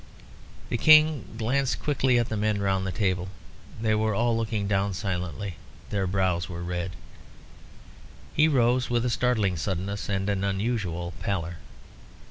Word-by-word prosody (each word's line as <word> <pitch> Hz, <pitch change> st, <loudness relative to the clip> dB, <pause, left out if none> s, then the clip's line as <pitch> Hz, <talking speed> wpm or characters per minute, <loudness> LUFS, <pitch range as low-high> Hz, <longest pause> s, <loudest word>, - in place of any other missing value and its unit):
The 120 Hz, -, -1 dB
King 155 Hz, -1 st, +6 dB
glanced 130 Hz, +4 st, 0 dB
quickly 135 Hz, -4 st, +2 dB
at 120 Hz, -1 st, +1 dB
the 110 Hz, -, -2 dB
men 105 Hz, 0 st, 0 dB
round 95 Hz, -1 st, 0 dB
the -, -, -1 dB
table. 95 Hz, -2 st, -1 dB, 0.5 s
They 110 Hz, -1 st, +1 dB
were 110 Hz, -1 st, +1 dB
all 120 Hz, +2 st, +2 dB
looking 110 Hz, -3 st, -1 dB
down 100 Hz, -1 st, 0 dB
silently: 90 Hz, -2 st, -4 dB, 0.3 s
their 95 Hz, -2 st, 0 dB
brows 90 Hz, -2 st, 0 dB
were 85 Hz, -1 st, -5 dB
red. 90 Hz, +1 st, -3 dB, 1.4 s
He 155 Hz, +2 st, +4 dB
rose 125 Hz, -3 st, +2 dB
with 120 Hz, 0 st, +1 dB
a 125 Hz, -, +1 dB
startling 110 Hz, -8 st, +1 dB
suddenness, 95 Hz, +4 st, -3 dB
and 95 Hz, -1 st, -1 dB
an 100 Hz, -1 st, 0 dB
unusual 95 Hz, -4 st, -2 dB
pallor. 85 Hz, -4 st, -2 dB
100 Hz, 145 wpm, -26 LUFS, 95-120 Hz, 1.4 s, King